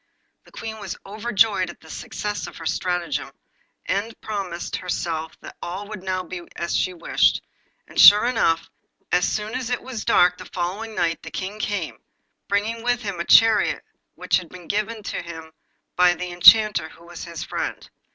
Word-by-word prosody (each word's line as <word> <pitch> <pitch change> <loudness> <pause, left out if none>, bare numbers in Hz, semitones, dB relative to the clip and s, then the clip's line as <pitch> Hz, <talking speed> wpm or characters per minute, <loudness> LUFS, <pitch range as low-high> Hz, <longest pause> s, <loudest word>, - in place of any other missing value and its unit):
The - - -19
Queen 220 -1 -7
was 205 - -6
overjoyed 210 -2 +1
at - - -10
the 160 - -17
success 205 -6 -4
of - - -10
her 165 - -9
stratagem, 175 +1 -2 0.5
end 205 +4 -2
promised 195 -5 -4
herself 165 -3 -3
that - - -10
all 190 +4 -5
would 215 -3 -7
now 185 -1 -2
be 185 -1 -7
as 170 - -2
she 185 - +1
wished; 170 -2 +2 0.5
and - - +1
sure 210 +2 +10
enough, 225 -10 +1 0.4
as 180 0 +2
soon 215 +1 -3
as 255 -2 -3
it 245 - -2
was 250 -4 -5
dark 180 0 +4
the - - -9
following 195 +5 -4
night 170 -1 0
the - - -8
King 195 +3 -5
came, 205 -1 -3 0.5
bringing 210 +3 -1
with 245 +1 0
him 200 -4 -4
a 170 - -2
chariot 225 -1 +5 0.3
which - - +1
had 180 -3 -7
been 180 -2 -12
given 215 +1 -2
him 165 -5 -6 0.4
by 180 0 +6
an 175 - 0
Enchanter 180 0 +6
who 170 - -17
was 175 0 -8
his 170 -2 -6
friend. - - -5
190 Hz, 175 wpm, -23 LUFS, 175-215 Hz, 0.5 s, sure